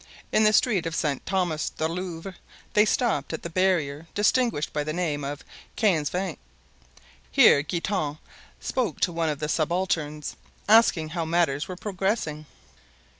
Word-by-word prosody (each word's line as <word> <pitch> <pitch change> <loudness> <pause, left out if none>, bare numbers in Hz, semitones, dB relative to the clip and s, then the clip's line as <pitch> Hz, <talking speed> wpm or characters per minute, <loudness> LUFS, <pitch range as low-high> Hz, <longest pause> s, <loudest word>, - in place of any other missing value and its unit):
In 215 - +4
the 215 - +6
street 210 -6 +2
of 165 - -4
Saint 145 -4 -1
Thomas 180 -5 0
du 160 - -2
Louvre 180 +1 -5 0.4
they 210 0 +5
stopped 215 - 0
at 160 - -5
the 170 - -5
barrier 165 -5 0
distinguished 215 - +1
by 150 -1 0
the 155 +1 -3
name 155 -4 -1
of 145 +1 -5 0.3
Quinze 170 -10 +2
Vingts. 180 -3 -3 0.9
Here 140 - +6
Guitant 155 -1 -2 0.4
spoke 235 - -2
to 180 - +2
one 165 -1 -1
of 150 - -2
the 150 +1 -3
subalterns, 155 -2 -1 0.3
asking 205 -8 +5
how 165 0 -2
matters 160 -3 +1
were 185 - -6
progressing. 185 -6 -2
165 Hz, 150 wpm, -26 LUFS, 150-190 Hz, 0.9 s, the